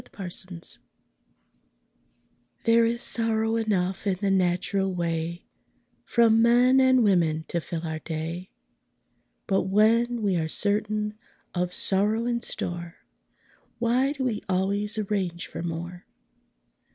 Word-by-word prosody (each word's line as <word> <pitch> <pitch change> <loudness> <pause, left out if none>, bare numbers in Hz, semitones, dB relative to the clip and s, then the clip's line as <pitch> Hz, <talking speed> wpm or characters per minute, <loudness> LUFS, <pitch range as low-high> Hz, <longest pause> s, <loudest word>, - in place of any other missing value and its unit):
THE - - -21
POWER 195 - -8
OF 175 - -5
THE 185 - -2
DOG 170 - -11 2.0
There 230 0 +4
is 235 +1 -1
sorrow 225 -1 0
enough 195 -3 -1
in 190 - +2
the 200 -1 0
natural 190 +1 +1
way 170 0 -3 0.6
From 225 -1 +4
men 245 +3 +5
and 260 -2 +5
women 165 -6 +2
to 170 - -1
fill 165 +1 -5
our 160 -1 -3
day; 165 +3 -5 1.0
But 195 -1 +1
when 230 +4 +3
we 195 -3 +2
are 160 -1 -1
certain 210 +2 0 0.3
of 180 0 -1
sorrow 210 +5 +2
in 240 -1 -1
store, 175 -3 -5 0.8
Why 250 +4 +1
do 270 -3 -4
we 230 -5 -1
always 200 +3 0
arrange 195 -5 -2
for - - -7
more? 170 +2 -6
200 Hz, 130 wpm, -26 LUFS, 175-225 Hz, 2.0 s, men